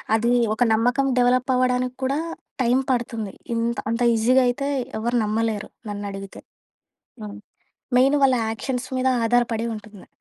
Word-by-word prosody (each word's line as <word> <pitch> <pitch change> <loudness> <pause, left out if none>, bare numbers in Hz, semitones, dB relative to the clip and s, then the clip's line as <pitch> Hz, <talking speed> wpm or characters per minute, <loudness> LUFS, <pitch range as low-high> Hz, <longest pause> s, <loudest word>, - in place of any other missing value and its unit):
అది 235 +2 +1 0.2
ఒక 220 - +1
నమ్మకం 245 +5 +2
డెవలప్ 250 +2 +2
అవ్వడానికి 250 0 +1
కూడా 275 +3 0 0.4
టైం 245 0 +3
పడుతుంది. 230 -5 -2 0.2
ఇంత 235 +1 -1
అంత 230 +1 -2
ఈజీగా 250 +4 +4
అయితే 260 +3 -1 0.3
ఎవరు 235 +2 -1
నమ్మలేరు 215 0 -1 0.2
నన్నడిగితే. 200 -1 -6 0.8
హ్మ్, 205 -1 -7 0.6
మెయిన్ 270 +3 +4
వాళ్ళ 260 -1 +5 0.2
యాక్షన్స్ 250 +2 -4
మీద 255 0 +1 0.2
ఆధారపడి 230 -1 +1
ఉంటుంది. 210 -2 -12
240 Hz, 130 wpm, -23 LUFS, 220-255 Hz, 0.8 s, వాళ్ళ